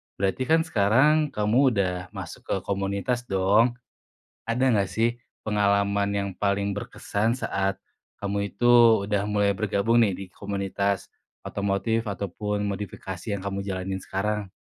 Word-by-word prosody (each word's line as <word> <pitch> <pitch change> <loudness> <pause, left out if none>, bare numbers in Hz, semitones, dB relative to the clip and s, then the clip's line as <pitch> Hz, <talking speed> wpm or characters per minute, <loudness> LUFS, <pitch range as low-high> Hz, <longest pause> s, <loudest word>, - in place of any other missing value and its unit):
Berarti 100 +6 0
kan 160 0 +4
sekarang 150 - +3
kamu 105 +3 +1 0.2
udah 95 -2 +1 0.2
masuk - - -7
ke - - 0
komunitas 100 +5 -1
dong. 100 +6 +3 0.7
Ada 125 +3 +2
gak 100 -2 +1
sih 115 +1 +2 0.4
pengalaman 100 -1 +2
yang 100 0 -1
paling 100 0 0
berkesan 110 +3 -2
saat 95 -4 -1 0.4
kamu 100 0 -2
itu 120 -1 +6
udah 100 -1 0
mulai 100 -1 +2
bergabung 110 +3 +2
nih 100 -4 +2
di 100 - -5
komunitas 100 -1 -2 0.4
otomotif 100 +3 -1
ataupun 105 +2 -3
modifikasi 95 -2 -5
yang 95 - -5
kamu 100 0 -3
jalanin 95 0 -3
sekarang? 105 0 -2
100 Hz, 130 wpm, -25 LUFS, 100-110 Hz, 0.7 s, itu